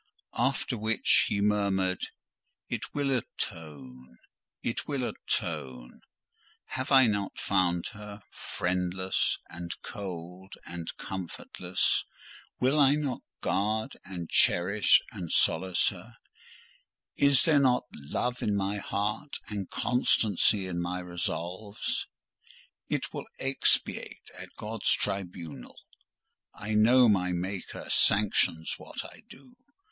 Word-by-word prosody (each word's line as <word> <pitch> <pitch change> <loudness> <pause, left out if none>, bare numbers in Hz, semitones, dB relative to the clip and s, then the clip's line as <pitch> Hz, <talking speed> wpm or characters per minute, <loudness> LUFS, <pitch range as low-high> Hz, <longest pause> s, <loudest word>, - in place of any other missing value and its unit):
After 125 -1 0
which 110 +1 +3
he 100 - 0
murmured, 100 -3 +1 0.7
"It - - -2
will 140 -1 0
atone—it 70 - -6
will 140 -3 -1
atone. 60 -2 -3 0.7
Have 130 +2 -3
I 135 -1 +8
not 100 -3 -1
found 90 -3 +1
her 105 -1 -10
friendless, 90 +1 -1
and 85 0 -7
cold, 95 -2 -7
and 85 -1 -6
comfortless? 90 0 -2 0.6
Will 135 +4 +3
I 140 0 +6
not 145 -4 -2 0.2
guard, 110 +2 0
and 90 -3 -6
cherish, 95 +6 +5
and 90 -6 -6
solace 90 +2 +3
her? - - -11 1.0
Is 140 -2 +5
there 155 -3 +5
not 130 -3 +3
love 120 - -3
in 105 - +1
my 100 +1 0
heart, 105 +8 -2
and 100 -3 -4
constancy 105 -5 +2
in 85 -2 -3
my 90 +1 -2
resolves? 90 +3 -3 0.8
It - - -2
will - - -5
expiate 135 0 0
at - - -10
God's 110 0 -1
tribunal. 90 -9 -4 0.8
I 110 +1 -4
know 120 +4 +6
my 90 -4 +2
Maker 95 +2 -4
sanctions 95 -5 +3
what - - -6
I - - -12
do. 250 - -15
100 Hz, 110 wpm, -29 LUFS, 90-110 Hz, 1.0 s, I